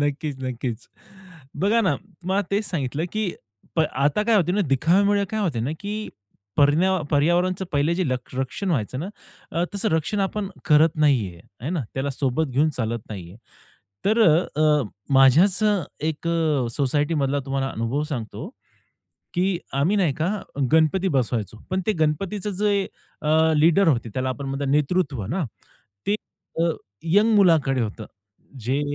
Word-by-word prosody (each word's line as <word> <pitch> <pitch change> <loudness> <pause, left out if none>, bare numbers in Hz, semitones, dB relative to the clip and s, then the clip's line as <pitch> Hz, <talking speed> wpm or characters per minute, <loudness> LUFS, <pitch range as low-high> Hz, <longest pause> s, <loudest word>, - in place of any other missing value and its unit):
नक्कीच, 145 0 -1
नक्कीच. 125 -2 -4 0.8
बघा 220 +4 +3
ना 195 - +2 0.3
मला 190 +2 +1
तेच 205 +2 +1
सांगितलं, 150 -2 -2
की 215 -3 -1 0.5
प - - +4
आता 145 +9 +1
काय 225 +1 +2
होतंय 180 -3 +2
ना, 210 - +2
दिखाव्यामुळे 200 +9 +3
काय 220 0 -1
होत 165 - -1
ना, 135 - -1
की 210 +1 -4 0.5
पर्णा 170 +6 +3
पर्यावरणचं 175 +5 +2
पहिले 145 +3 +2
जे 185 +1 0
लक 125 0 -4
रक्षण 135 +9 -2
व्हायचं 130 -3 -1
ना, 175 - -4 0.4
अ, 170 - +1
तसं 200 +2 0
रक्षण 160 +6 0
आपण 195 0 -1 0.2
करत 155 +1 +4
नाही 140 -9 +3
आहे. 85 +2 -16 0.2
है 150 - -2
ना? 180 - -1
त्याला 135 +1 -1
सोबत 135 +3 0
घेऊन 145 +5 +2
चालत 115 -1 -2
नाही 95 -6 -7
आहे. 95 - -13 0.7
तर 220 +3 +3
अ, 155 -3 +3
अ, 150 -2 +4 0.3
माझ्याच 160 - +5 0.5
एक 160 +1 -3
अ, 155 -6 +1
सोसायटीमधला 145 0 +1
तुम्हाला 135 0 -1
अनुभव 115 +6 -2
सांगतो, 130 - -5 0.9
की 180 0 +1 0.2
आम्ही 150 +10 +2
नाही 170 -8 +2
का, 160 +6 -1 0.4
गणपती 160 +4 +3
बसवायचो. 120 - -1
पण 185 +1 0
ते 215 - +3
गणपतीचं 185 +7 -1
जे 200 -2 +2 0.4
अ, 160 +1 +3
लीडर 170 +5 +4
होते 120 -6 +2
त्याला 130 0 -1
आपण 140 +2 -4
म्हणतात 135 +1 -2
नेतृत्व 145 - +1
ना, 170 - -1 0.6
ते 205 - +3 0.4
अ, 170 0 +3 0.4
यंग 215 +2 +5
मुलाकडे 160 -9 +4
होतं. 110 0 -4 0.5
जे 130 +5 -1
155 Hz, 155 wpm, -23 LUFS, 135-185 Hz, 0.9 s, माझ्याच